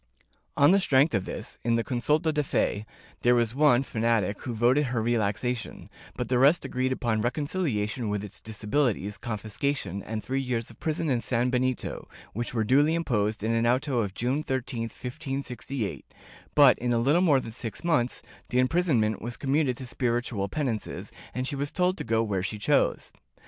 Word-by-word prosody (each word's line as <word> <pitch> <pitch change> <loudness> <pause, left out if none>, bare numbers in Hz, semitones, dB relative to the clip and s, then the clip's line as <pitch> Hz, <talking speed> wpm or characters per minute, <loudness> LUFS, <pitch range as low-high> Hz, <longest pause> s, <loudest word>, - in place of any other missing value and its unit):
On 145 +4 +6
the 195 - +5
strength 145 -4 +3
of 100 -3 0
this, - - -5
in 115 0 +2
the 115 - +1
consulta 150 +6 +1
de 150 - +1
fe, 110 -6 -1 0.3
there 120 0 +4
was 120 -1 +1
one 135 -2 +4
fanatic 110 -5 0
who 125 - -4
voted 125 +6 +3
her 125 -2 -1
relaxation, 115 +1 -1 0.2
but - - -3
the 125 -1 +2
rest 145 +7 +5
agreed 130 +1 -1
upon 115 -4 0
recon 130 +6 -1
ciliation 120 - -1
with 105 -1 -2
its 105 - -6
disabilities, 105 -1 -1
confiscation 110 -2 -3
and 110 +2 -5
three 135 +1 -1
years 120 -3 -2
of 110 - -18
prison 160 +1 -1
and 120 -2 +1
sanbenito, 125 +1 -1 0.3
which 120 +3 -3
were 115 -2 0
duly 145 +8 +4
imposed 110 -10 0
in 115 +1 +1
an 115 +1 +2
auto 130 +1 +1
of 100 -3 -2
June 130 +5 0
13, 125 -5 -3
1568, 130 -2 -5 0.5
but, 140 -3 +7
in 125 0 -1
a - - +2
little 140 +9 +3
more 150 -7 +4
than 115 - -7
six 115 - -5
months, 145 -8 +1 0.3
the 125 - -1
imprisonment 130 - +2
was 120 +1 -5
commuted 135 -2 +1
to 130 - -7
spiritual 120 -4 -1
penances, 120 -3 -3 0.2
and 130 +2 -3
she 140 - -2
was 140 +1 -2
told 180 0 +1
to - - -5
go 115 0 +1
where 100 -4 -1
she 100 +3 -3
chose. 105 - +1
125 Hz, 180 wpm, -27 LUFS, 110-140 Hz, 0.5 s, but